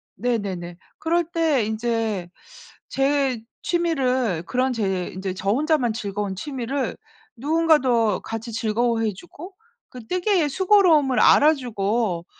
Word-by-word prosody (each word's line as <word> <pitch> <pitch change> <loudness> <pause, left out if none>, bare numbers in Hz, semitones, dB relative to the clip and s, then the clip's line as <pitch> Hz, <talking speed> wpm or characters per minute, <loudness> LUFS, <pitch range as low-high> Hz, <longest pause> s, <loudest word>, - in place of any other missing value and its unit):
네네네. 190 -6 -3 0.2
그럴 340 +2 +1
때 320 -8 +1
인제 220 -4 -2 0.6
제 270 -3 0 0.2
취미를 260 - 0
그런 255 +6 0
제 190 -5 -1
인제 190 0 -5
저 195 +1 -3
혼자만 280 -2 +1
즐거운 200 -2 -4
취미를 265 +4 -3 0.4
누군가도 270 - +2
같이 225 +1 -6
즐거워해 225 0 0
주고 350 - -12 0.3
그 250 -3 -11
뜨개의 365 - +1
수고로움을 340 -7 +4
알아주고 225 - +2
245 Hz, 250 characters per minute, -23 LUFS, 210-295 Hz, 0.6 s, 수고로움을